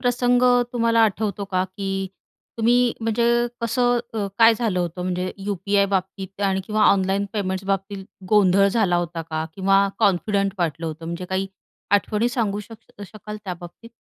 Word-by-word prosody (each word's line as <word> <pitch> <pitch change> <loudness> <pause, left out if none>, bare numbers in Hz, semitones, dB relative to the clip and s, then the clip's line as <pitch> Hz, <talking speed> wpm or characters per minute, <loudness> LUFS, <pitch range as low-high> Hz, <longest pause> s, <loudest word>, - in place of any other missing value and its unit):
प्रसंग 245 0 +2 0.3
तुम्हाला 230 -1 +2
आठवतो 205 -1 -2
का 185 -1 -1
की 195 0 -4 0.5
तुम्ही, 240 +1 +3
म्हणजे 225 +1 0 0.4
कसं 245 +1 +1 0.2
अ, 210 -2 -1
काय 225 0 +7
झालं 220 -5 -1
होतं, 175 +1 -3
म्हणजे 180 0 -2
यू-पी-आयबाबतीत 195 0 -1
आणि 195 -1 +1
किंवा 215 0 0
ऑनलाईन 195 0 +3
पेमेंट्सबाबतीत 195 0 -3 0.2
गोंधळ 200 -2 +4
झाला 200 -4 +2
होता 170 -1 -3
का 160 -1 -4
किंवा 195 +1 +3
कॉन्फिडंट 200 -1 +1
वाटलं 165 -1 -2
होतं. 160 +1 -6
म्हणजे 170 +2 -5
काही 190 +1 -2 0.5
आठवणी 210 +3 +1
सांगू 215 -4 -1
शक 215 -1 -14
शकाल 210 0 -9
त्याबाबतीत? 180 +4 -8
200 Hz, 140 wpm, -22 LUFS, 185-220 Hz, 0.5 s, काय